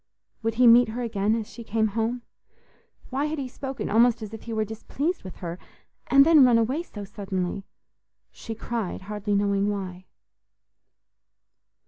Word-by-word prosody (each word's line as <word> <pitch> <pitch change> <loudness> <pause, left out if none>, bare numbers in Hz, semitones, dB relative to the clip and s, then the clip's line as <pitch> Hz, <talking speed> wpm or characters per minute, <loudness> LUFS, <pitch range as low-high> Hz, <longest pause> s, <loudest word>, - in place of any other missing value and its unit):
Would 225 0 -1
he 250 +2 +4
meet 240 +1 +8
her 240 +3 -4
again 215 -2 0
as 220 -2 -3
she 235 - -10
came 220 0 0
home? 230 +3 -2 0.9
Why 275 +3 0
had 310 +1 -2
he 270 -2 -3
spoken 270 +1 -5
almost 230 +1 +3
as 215 0 -8
if 220 - -7
he 230 - -8
were 215 -1 0
displeased 280 - -3
with 185 - -9
her? 175 0 -6 0.5
And 275 0 +6
then 315 -3 +7
run 245 -2 +6
away 250 +8 +1
so 210 -12 -9
suddenly? 195 -2 -4 0.7
She 225 - -7
cried, 225 -5 -4
hardly 205 +1 -2
knowing 200 0 +1
why. 185 -2 -5
225 Hz, 160 wpm, -26 LUFS, 205-245 Hz, 0.9 s, meet